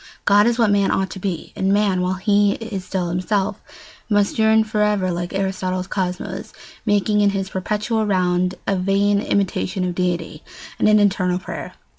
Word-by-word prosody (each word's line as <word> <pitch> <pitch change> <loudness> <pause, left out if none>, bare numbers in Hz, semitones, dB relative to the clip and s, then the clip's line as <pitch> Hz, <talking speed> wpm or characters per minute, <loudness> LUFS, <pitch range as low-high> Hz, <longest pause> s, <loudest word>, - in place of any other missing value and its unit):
God 205 +2 +5
is 240 0 +1
what 225 -4 +3
man 200 -1 +2
ought 190 -1 0
to 190 - -7
be; 180 -4 -4
and 190 +1 0
man, 200 -2 +2
while 180 +1 0
he 205 +1 +2
is 220 -5 -6
still 180 -2 -2
himself, 190 +3 -1 0.5
must 205 0 +1
yearn 220 0 +4
for 215 -1 -2
ever, 205 -3 +1
like 175 0 -3
Aristotle's 185 -1 -2
cosmos, 190 +2 -4 0.3
making 210 0 +2
in 205 - +4
his 195 -1 -3
perpetual 215 +3 -1
round 180 -1 +1
a 195 - +1
vain 200 +2 +2
imitation 195 -1 -1
of 180 -1 -1
deity, 175 -3 -2 0.4
and - - +4
an 215 0 +5
eternal 190 -3 +2
prayer. 185 - -7
195 Hz, 175 wpm, -21 LUFS, 185-205 Hz, 0.5 s, God